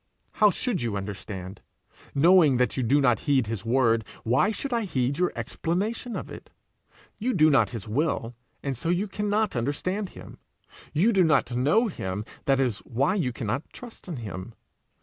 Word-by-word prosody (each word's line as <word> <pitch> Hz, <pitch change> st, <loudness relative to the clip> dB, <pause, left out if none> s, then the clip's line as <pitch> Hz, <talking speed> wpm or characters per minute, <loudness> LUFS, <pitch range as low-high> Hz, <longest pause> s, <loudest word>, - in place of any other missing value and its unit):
How 210 Hz, -1 st, +5 dB
should 210 Hz, +1 st, -2 dB
you 115 Hz, -4 st, -1 dB
understand? 95 Hz, -1 st, -7 dB, 0.5 s
Knowing 160 Hz, -2 st, +6 dB
that 125 Hz, 0 st, +1 dB
you 130 Hz, -, -1 dB
do 130 Hz, +5 st, +3 dB
not 125 Hz, -5 st, +3 dB
heed 135 Hz, -5 st, +2 dB
his 110 Hz, -2 st, -4 dB
word, 115 Hz, -1 st, +2 dB, 0.2 s
why 130 Hz, -, +3 dB
should 245 Hz, +5 st, -3 dB
I 235 Hz, -, +1 dB
heed 140 Hz, -, -1 dB
your 180 Hz, -, +2 dB
explanation 215 Hz, +8 st, -2 dB
of -, -, -6 dB
it? -, -, -10 dB, 0.7 s
You 245 Hz, +3 st, 0 dB
do 155 Hz, -3 st, +5 dB
not 120 Hz, -8 st, +4 dB
his 115 Hz, -4 st, -7 dB
will, 120 Hz, -1 st, -1 dB, 0.3 s
and 140 Hz, -2 st, -2 dB
so 145 Hz, +8 st, -3 dB
you 180 Hz, +4 st, +1 dB
cannot 210 Hz, 0 st, -1 dB
understand 180 Hz, -, -2 dB
him; -, -, -12 dB, 0.5 s
you 205 Hz, +10 st, +3 dB
do 190 Hz, -2 st, +5 dB
not 150 Hz, -6 st, +2 dB
know 150 Hz, -, +3 dB
him, 100 Hz, -, -4 dB, 0.2 s
that 135 Hz, -1 st, +3 dB
is 125 Hz, -6 st, 0 dB
why 135 Hz, +9 st, 0 dB
you 170 Hz, -11 st, 0 dB
cannot 120 Hz, +3 st, -4 dB
trust 240 Hz, -5 st, -11 dB
in 175 Hz, -, -4 dB
him. 110 Hz, -2 st, -7 dB
140 Hz, 175 wpm, -26 LUFS, 115-190 Hz, 0.7 s, Knowing